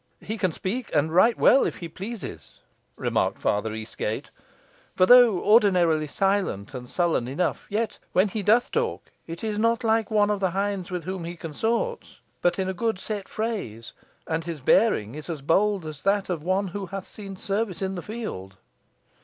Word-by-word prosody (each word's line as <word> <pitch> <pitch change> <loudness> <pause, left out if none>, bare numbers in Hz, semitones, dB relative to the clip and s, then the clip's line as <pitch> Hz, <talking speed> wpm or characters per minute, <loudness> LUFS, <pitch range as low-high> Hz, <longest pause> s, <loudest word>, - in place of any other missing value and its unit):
"He 220 - -4
can 185 -3 +1
speak, 215 +10 -4
and 155 +2 +2
right 225 +7 +5
well 270 - +6
if - - -2
he 170 - -6
pleases," 185 - -8 0.4
remarked - - 0
Father 105 +2 0
Eastgate; 110 0 -4 0.6
"for 185 - +5
though 245 -3 +7
ordinarily 180 -8 +4
silent 190 - 0
and 125 -1 -7
sullen 170 -9 +1
enough, 155 +7 -2
yet 220 +2 -2
when 185 +3 +3
he 210 +2 -3
doth 220 +5 +3
talk 465 0 -2 0.2
it 165 +3 -7
is 215 -1 -2
not 230 +2 +2
like 225 -1 +2
one 210 -1 +3
of 205 - -1
the 190 -1 +1
hinds 195 0 -2
with 180 -2 -4
whom 185 +1 -4
he 170 +1 -5
consorts, 225 - -3 0.2
but 175 0 +2
in 190 -1 -1
good 220 +2 -1
set 205 0 -5
phrase; 200 - -4 0.3
and 160 0 -2
his 170 -3 -5
bearing 130 - +3
is 155 +3 -8
as 155 -5 -5
bold 195 +4 +2
as 155 -2 -7
that 200 0 +1
of 170 -4 -2
one 190 +4 0
who 195 +1 -5
hath 195 +1 -6
seen 195 -2 -9
service 200 -1 -2
in 190 0 -2
the 180 - -4
field." 165 - -6
190 Hz, 180 wpm, -25 LUFS, 165-215 Hz, 0.6 s, though